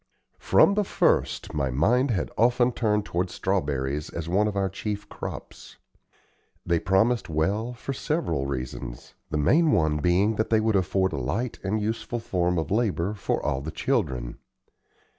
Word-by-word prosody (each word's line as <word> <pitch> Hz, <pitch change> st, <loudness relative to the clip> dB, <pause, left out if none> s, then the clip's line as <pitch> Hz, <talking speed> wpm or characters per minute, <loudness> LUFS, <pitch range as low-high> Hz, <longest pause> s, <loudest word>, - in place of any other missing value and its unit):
From 200 Hz, -, +5 dB
the 210 Hz, +1 st, +2 dB
first, -, -, +1 dB
my 70 Hz, -3 st, 0 dB
mind 120 Hz, -, +2 dB
had 100 Hz, -8 st, -1 dB
often 120 Hz, +2 st, +3 dB
turned 105 Hz, -3 st, 0 dB
toward 90 Hz, +2 st, -1 dB
strawberries 75 Hz, -7 st, -1 dB
as 85 Hz, -1 st, -5 dB
one 100 Hz, +5 st, +2 dB
of 105 Hz, -, -3 dB
our 100 Hz, -1 st, +1 dB
chief 100 Hz, +2 st, -5 dB
crops. -, -, -8 dB, 0.9 s
They 85 Hz, -1 st, +2 dB
promised 110 Hz, +7 st, +2 dB
well 100 Hz, +10 st, 0 dB
for 125 Hz, +3 st, -5 dB
several 105 Hz, -, -1 dB
reasons, 65 Hz, -2 st, -6 dB, 0.2 s
the 75 Hz, -, -1 dB
main 155 Hz, -, +4 dB
one 80 Hz, -, +2 dB
being 95 Hz, +8 st, +2 dB
that 110 Hz, -, 0 dB
they 110 Hz, -, +4 dB
would 110 Hz, -1 st, +1 dB
afford 95 Hz, 0 st, +1 dB
a -, -, -2 dB
light 110 Hz, -, -2 dB
and 100 Hz, +3 st, 0 dB
useful 110 Hz, +3 st, -2 dB
form 90 Hz, -6 st, 0 dB
of 80 Hz, 0 st, -2 dB
labor 105 Hz, -4 st, 0 dB
for 105 Hz, -, -2 dB
all 65 Hz, -, 0 dB
the 75 Hz, -, -5 dB
children. -, -, -2 dB
95 Hz, 160 wpm, -26 LUFS, 80-110 Hz, 0.9 s, From